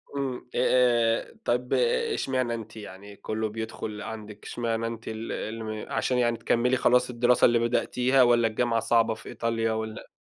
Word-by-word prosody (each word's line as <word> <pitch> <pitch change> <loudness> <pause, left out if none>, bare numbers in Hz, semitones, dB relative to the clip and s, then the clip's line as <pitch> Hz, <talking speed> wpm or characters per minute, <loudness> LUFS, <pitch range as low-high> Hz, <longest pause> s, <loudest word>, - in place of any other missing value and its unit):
إمم، 135 -3 -2 0.2
أ - - -1
آآ، 120 -2 +2
طَب، 125 +1 0 0.4
إشمعنى 130 - -1
أنتِ 115 -1 -7
يعني؟ 100 -1 -10
كله 110 +1 -3
بيدخل 110 -1 -6
عندِك 105 -2 -8
إشمعنى 115 -1 -2
أنتِ 115 0 -7
ال 110 +1 -5
الم 110 -1 -5
عشان 125 - 0
يعني 120 -1 +2
تكملي 125 +2 +1
خلاص 125 +1 +3
الدراسة 120 0 +3
اللي 120 -1 +4
بدأتيها 125 +2 +2
والّا 120 -1 +4
الجامعة 115 +1 0
صعبة 115 0 +2
في 110 - -11
إيطاليا 115 -1 -1
والّا 110 0 -4
115 Hz, 160 wpm, -27 LUFS, 110-125 Hz, 0.4 s, اللي